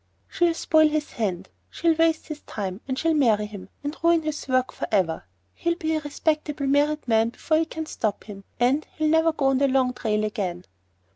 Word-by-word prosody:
"She'll 345 Hz, -2 st, +1 dB
spoil 315 Hz, -1 st, +4 dB
his 305 Hz, 0 st, -2 dB
hand. 190 Hz, -4 st, -3 dB, 0.2 s
She'll 335 Hz, 0 st, +1 dB
waste 325 Hz, 0 st, +2 dB
his 300 Hz, -1 st, -6 dB
time, 195 Hz, 0 st, -5 dB
and 260 Hz, -1 st, -2 dB
she'll 330 Hz, +2 st, +1 dB
marry 225 Hz, -8 st, +3 dB
him, 200 Hz, -3 st, -10 dB
and 290 Hz, +2 st, -3 dB
ruin 335 Hz, -1 st, +3 dB
his 310 Hz, -2 st, -4 dB
work 255 Hz, -1 st, +1 dB
for -, -, -5 dB
ever. 175 Hz, -, +1 dB, 0.3 s
He'll 340 Hz, 0 st, -1 dB
be 320 Hz, -2 st, -2 dB
a 310 Hz, -, +1 dB
respectable 300 Hz, 0 st, -2 dB
married 290 Hz, +1 st, +1 dB
man 225 Hz, 0 st, +3 dB
before 315 Hz, +6 st, 0 dB
we 325 Hz, -, +1 dB
can 320 Hz, 0 st, -6 dB
stop 215 Hz, -8 st, -3 dB
him, 200 Hz, -2 st, -10 dB, 0.2 s
and—he'll 285 Hz, +5 st, +1 dB
never 320 Hz, +1 st, +4 dB
go 300 Hz, -3 st, -2 dB
on 270 Hz, -1 st, +3 dB
the 280 Hz, -, +3 dB
long 260 Hz, -1 st, +2 dB
trail 215 Hz, -3 st, -1 dB
again." 185 Hz, -5 st, -3 dB
280 Hz, 200 wpm, -25 LUFS, 215-315 Hz, 0.3 s, spoil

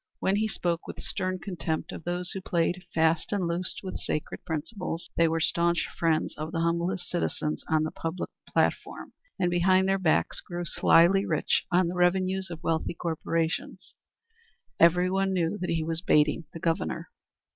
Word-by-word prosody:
When 195 Hz, +1 st, +1 dB
he 220 Hz, +1 st, +1 dB
spoke 175 Hz, -4 st, -2 dB
with -, -, -7 dB
stern 185 Hz, -1 st, -2 dB
contempt 175 Hz, -4 st, -3 dB
of -, -, -8 dB
those 175 Hz, 0 st, -2 dB
who 190 Hz, -, -4 dB
played 175 Hz, +1 st, 0 dB
fast 160 Hz, 0 st, +2 dB
and 195 Hz, -4 st, 0 dB
loose 175 Hz, +2 st, -2 dB
with 185 Hz, -, -5 dB
sacred 150 Hz, -, -3 dB
principles 170 Hz, +1 st, -4 dB
who 165 Hz, -1 st, +4 dB
were 165 Hz, 0 st, 0 dB
staunch 170 Hz, +1 st, +2 dB
friends 165 Hz, -2 st, +1 dB
of 155 Hz, +1 st, -4 dB
the 165 Hz, -, -1 dB
humblest 170 Hz, +2 st, 0 dB
citizens 155 Hz, -3 st, -2 dB
on 155 Hz, -1 st, +3 dB
the 155 Hz, -, -2 dB
public 165 Hz, +2 st, -4 dB, 0.2 s
platform, -, -, -1 dB, 0.2 s
and 180 Hz, -2 st, +1 dB
behind 185 Hz, +2 st, +4 dB
their 195 Hz, 0 st, +2 dB
backs 160 Hz, -4 st, +1 dB
grew 175 Hz, 0 st, -5 dB
slyly 175 Hz, +4 st, +5 dB
rich -, -, +1 dB
on 180 Hz, 0 st, +4 dB
the 175 Hz, -, -3 dB
revenues 185 Hz, +1 st, +1 dB
of 170 Hz, 0 st, -8 dB
wealthy 165 Hz, +1 st, -1 dB
corporations, 165 Hz, -1 st, -2 dB, 0.9 s
everyone 185 Hz, +3 st, +4 dB
knew 175 Hz, +2 st, 0 dB
that 180 Hz, -, -3 dB
he 165 Hz, -1 st, 0 dB
was 165 Hz, +1 st, -1 dB
baiting 150 Hz, 0 st, +3 dB
the 165 Hz, -, -8 dB
Governor. 165 Hz, 0 st, -2 dB
175 Hz, 165 wpm, -28 LUFS, 165-185 Hz, 0.9 s, slyly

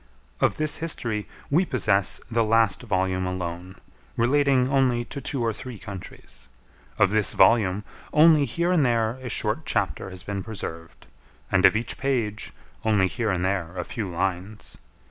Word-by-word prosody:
Of -, -, +2 dB
this 155 Hz, -1 st, +1 dB
history 115 Hz, -10 st, -2 dB, 0.2 s
we 165 Hz, +6 st, +4 dB
possess 100 Hz, -, +2 dB
the 115 Hz, 0 st, +2 dB
last 110 Hz, -2 st, +3 dB
volume 95 Hz, -4 st, -1 dB
alone, 90 Hz, 0 st, -5 dB, 0.4 s
relating 130 Hz, +1 st, +3 dB
only 130 Hz, -3 st, +2 dB
to 140 Hz, -, -7 dB
two 130 Hz, -4 st, -2 dB
or 115 Hz, -, 0 dB
three 125 Hz, +1 st, -8 dB
countries. 95 Hz, -, -9 dB, 0.5 s
Of 95 Hz, -, +4 dB
this 105 Hz, -1 st, +2 dB
volume, 100 Hz, -1 st, +4 dB, 0.3 s
only 155 Hz, -1 st, +6 dB
here 170 Hz, +8 st, -1 dB
and 170 Hz, -5 st, +3 dB
there 115 Hz, -1 st, +1 dB
a 125 Hz, -, -5 dB
short 105 Hz, +7 st, -1 dB
chapter 100 Hz, -4 st, -1 dB
has 95 Hz, -1 st, -9 dB
been 100 Hz, 0 st, -4 dB
preserved, 85 Hz, -6 st, -8 dB, 0.5 s
and 95 Hz, 0 st, +6 dB
of -, -, 0 dB
each 115 Hz, +2 st, -2 dB
page, 115 Hz, -6 st, -1 dB, 0.3 s
only 105 Hz, -4 st, +3 dB
here 115 Hz, +3 st, -2 dB
and 90 Hz, -2 st, 0 dB
there 95 Hz, -2 st, -2 dB
a 90 Hz, -, -3 dB
few 105 Hz, -5 st, -4 dB
lines. 95 Hz, +4 st, -4 dB
110 Hz, 160 wpm, -25 LUFS, 95-125 Hz, 0.5 s, only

